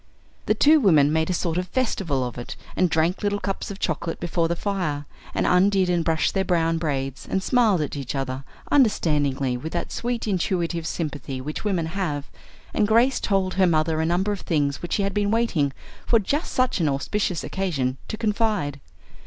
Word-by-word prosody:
The -, -, +3 dB
two 310 Hz, +2 st, +6 dB
women 155 Hz, -, +4 dB
made 160 Hz, +1 st, +1 dB
a -, -, +2 dB
sort 170 Hz, 0 st, -1 dB
of 180 Hz, -, -3 dB
festival 180 Hz, -, -1 dB
of 120 Hz, -, -5 dB
it, 120 Hz, -, -6 dB, 0.2 s
and 185 Hz, -, +3 dB
drank 165 Hz, +3 st, +1 dB
little 205 Hz, 0 st, 0 dB
cups 195 Hz, 0 st, -3 dB
of 200 Hz, -, -6 dB
chocolate 165 Hz, -2 st, -2 dB
before 170 Hz, -1 st, 0 dB
the 170 Hz, -, -1 dB
fire, 170 Hz, -7 st, -2 dB, 0.3 s
and -, -, +1 dB
undid 185 Hz, 0 st, +3 dB
and 175 Hz, -1 st, +1 dB
brushed 160 Hz, -1 st, +1 dB
their 195 Hz, -, +1 dB
brown 165 Hz, -3 st, +1 dB
braids, 135 Hz, -4 st, -3 dB
and 190 Hz, -, 0 dB
smiled 225 Hz, -9 st, +3 dB
at 150 Hz, -, -3 dB
each 140 Hz, -1 st, -4 dB
other, 135 Hz, 0 st, -3 dB, 0.3 s
understandingly, 145 Hz, -, +2 dB
with 160 Hz, +6 st, -6 dB
that 175 Hz, -, -3 dB
sweet 240 Hz, -1 st, -2 dB
intuitive 170 Hz, -3 st, -1 dB
sympathy 145 Hz, -6 st, -4 dB
which 150 Hz, +4 st, -5 dB
women 190 Hz, -6 st, 0 dB
have, 160 Hz, -5 st, -3 dB, 0.4 s
and 210 Hz, -, +2 dB
Grace 235 Hz, +5 st, +4 dB
told 195 Hz, -2 st, 0 dB
her 190 Hz, -1 st, +3 dB
mother 160 Hz, -1 st, +2 dB
a -, -, +1 dB
number 185 Hz, +4 st, +1 dB
of 205 Hz, -, -3 dB
things 145 Hz, -4 st, 0 dB
which 175 Hz, -, -4 dB
she 200 Hz, -, +1 dB
had 195 Hz, 0 st, -1 dB
been 205 Hz, -1 st, +1 dB
waiting 205 Hz, -11 st, +1 dB, 0.4 s
for 235 Hz, -, +5 dB
just 280 Hz, -, -1 dB
such 255 Hz, -5 st, +1 dB
an 155 Hz, -, +2 dB
auspicious 165 Hz, +6 st, -1 dB
occasion 140 Hz, -10 st, -1 dB
to 215 Hz, -, -4 dB
confide. 210 Hz, -10 st, 0 dB
175 Hz, 195 wpm, -24 LUFS, 150-200 Hz, 0.4 s, two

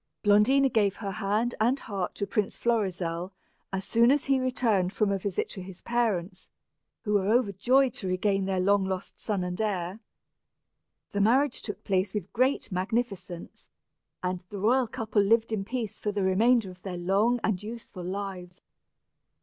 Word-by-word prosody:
Blondina 220 Hz, +7 st, +5 dB
gave 210 Hz, -6 st, +2 dB
her 200 Hz, -3 st, -5 dB
hand 215 Hz, +4 st, 0 dB
and 245 Hz, +5 st, +3 dB
heart 200 Hz, -8 st, -4 dB
to 200 Hz, -, -2 dB
Prince 200 Hz, 0 st, -1 dB
Florizel, 185 Hz, -6 st, -1 dB, 0.4 s
as 195 Hz, 0 st, -3 dB
soon 235 Hz, +1 st, +4 dB
as 285 Hz, +1 st, +3 dB
he 270 Hz, -1 st, +3 dB
returned 230 Hz, -8 st, +1 dB
from 205 Hz, 0 st, +1 dB
a 195 Hz, -, 0 dB
visit 190 Hz, -1 st, -2 dB
to 190 Hz, -, -7 dB
his 185 Hz, -1 st, -10 dB
parents, 220 Hz, -7 st, -1 dB, 0.5 s
who 210 Hz, -, -1 dB
were 200 Hz, -2 st, +2 dB
overjoyed 245 Hz, +3 st, +3 dB
to 190 Hz, -, -5 dB
regain 195 Hz, +1 st, +1 dB
their 190 Hz, -1 st, 0 dB
long 200 Hz, +2 st, +3 dB
lost 190 Hz, 0 st, -4 dB
son 200 Hz, -4 st, -1 dB
and 180 Hz, +3 st, -3 dB
heir. 190 Hz, -2 st, -2 dB, 1.1 s
The 200 Hz, -, 0 dB
marriage 255 Hz, +6 st, +3 dB
took 205 Hz, -1 st, -7 dB
place 195 Hz, +1 st, 0 dB
with 200 Hz, -2 st, -4 dB
great 255 Hz, -1 st, +1 dB
magnificence, 190 Hz, -2 st, -3 dB, 0.5 s
and 180 Hz, 0 st, -2 dB
the 205 Hz, -, -6 dB
royal 240 Hz, +5 st, +3 dB
couple 220 Hz, -1 st, 0 dB
lived 225 Hz, +3 st, +3 dB
in 210 Hz, -3 st, -1 dB
peace 225 Hz, -1 st, -4 dB
for 210 Hz, -, -1 dB
the 205 Hz, -1 st, -1 dB
remainder 210 Hz, +2 st, +3 dB
of 180 Hz, 0 st, -16 dB
their 185 Hz, -2 st, -5 dB
long 200 Hz, +7 st, +2 dB
and 195 Hz, -4 st, 0 dB
useful 215 Hz, -4 st, -8 dB
lives. 185 Hz, -1 st, -5 dB
205 Hz, 165 wpm, -28 LUFS, 190-230 Hz, 1.1 s, Blondina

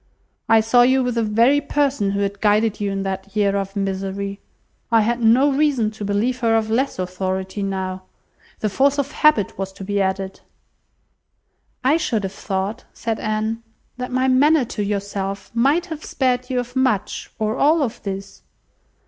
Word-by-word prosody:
I 225 Hz, -1 st, +6 dB
saw 225 Hz, +3 st, +4 dB
you 260 Hz, +2 st, +4 dB
with 250 Hz, -1 st, -1 dB
the 230 Hz, -, 0 dB
very 230 Hz, +7 st, +3 dB
person 280 Hz, -7 st, 0 dB
who 200 Hz, +1 st, -1 dB
had 200 Hz, 0 st, -2 dB
guided 210 Hz, 0 st, +2 dB
you 205 Hz, -, 0 dB
in 195 Hz, 0 st, -2 dB
that 195 Hz, +1 st, -5 dB
year 200 Hz, -1 st, +2 dB
of 195 Hz, 0 st, -3 dB
misery. 195 Hz, 0 st, -3 dB, 0.5 s
I 225 Hz, -1 st, +5 dB
had 235 Hz, +3 st, 0 dB
no 245 Hz, +6 st, +5 dB
reason 270 Hz, -7 st, +2 dB
to 215 Hz, -1 st, -8 dB
believe 210 Hz, +5 st, 0 dB
her 230 Hz, -1 st, +2 dB
of 220 Hz, 0 st, -1 dB
less 265 Hz, +5 st, 0 dB
authority 185 Hz, +2 st, -3 dB
now. 190 Hz, -1 st, -3 dB, 0.6 s
The 215 Hz, -, +1 dB
force 275 Hz, +5 st, +2 dB
of 280 Hz, 0 st, -1 dB
habit 265 Hz, -12 st, +2 dB
was 195 Hz, 0 st, -3 dB
to 195 Hz, -, -9 dB
be 200 Hz, +1 st, 0 dB
added." 190 Hz, 0 st, -2 dB, 1.4 s
"I 280 Hz, +5 st, +4 dB
should 225 Hz, -10 st, -1 dB
have 190 Hz, -, -3 dB
thought," 200 Hz, +4 st, -3 dB
said 225 Hz, -1 st, -3 dB
Anne, 215 Hz, +1 st, -2 dB, 0.4 s
"that 250 Hz, 0 st, -5 dB
my 255 Hz, +1 st, +1 dB
manner 280 Hz, +2 st, +4 dB
to 210 Hz, -2 st, -4 dB
yourself 200 Hz, -1 st, -3 dB
might 280 Hz, +9 st, +2 dB
have 320 Hz, -4 st, -7 dB
spared 250 Hz, -1 st, -1 dB
you 250 Hz, -1 st, 0 dB
much 255 Hz, -6 st, 0 dB
or 215 Hz, 0 st, -1 dB
all 305 Hz, +2 st, +4 dB
of 235 Hz, -, -4 dB
this." 195 Hz, 0 st, -6 dB
215 Hz, 175 wpm, -21 LUFS, 195-255 Hz, 1.4 s, I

